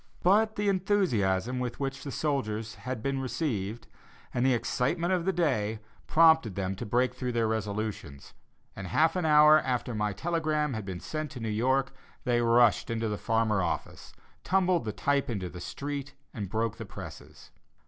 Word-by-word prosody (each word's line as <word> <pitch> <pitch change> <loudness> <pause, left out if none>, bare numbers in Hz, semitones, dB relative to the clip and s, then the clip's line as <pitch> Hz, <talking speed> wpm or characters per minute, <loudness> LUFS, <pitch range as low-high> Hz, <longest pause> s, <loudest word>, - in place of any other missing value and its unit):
But 215 +4 +4
the 205 0 -1
enthusiasm 130 - +1
with 125 -1 -4
which 135 -1 -3
the 140 - -5
soldiers 115 -8 -2
had 115 +3 -6
been 135 -1 -1
received, 120 - -3 0.5
and 120 - 0
the 130 -1 +4
excitement 165 +9 0
of 175 -2 0
the 190 - +2
day, 125 - 0 0.3
prompted 160 - +5
them 95 -1 -2
to 115 - -5
break 125 +3 +1
through 125 -1 -3
their 115 -1 +1
resolutions, 105 -9 -4 0.4
and, 95 - -6
half 160 - +2
an 180 -3 0
hour 150 0 +7
after 125 -3 -2
my 105 -1 0
telegram 155 - -1
had 110 -3 -4
been 95 -2 -5
sent 155 - -4
to 130 - -7
New 115 -1 -3
York, 130 +5 +1 0.3
they 120 -2 +2
rushed 115 -1 +4
into 115 -1 -1
the 105 - -2
Farmer 110 -3 +1
office, 85 - -4 0.3
tumbled 185 -6 +2
the 110 - -2
type 140 +5 0
into 95 -6 -3
the 90 - -9
street, 140 +5 -5 0.2
and 105 -6 -5
broke 110 +1 -1
the - - -6
presses. - - -11
125 Hz, 175 wpm, -29 LUFS, 110-150 Hz, 0.5 s, hour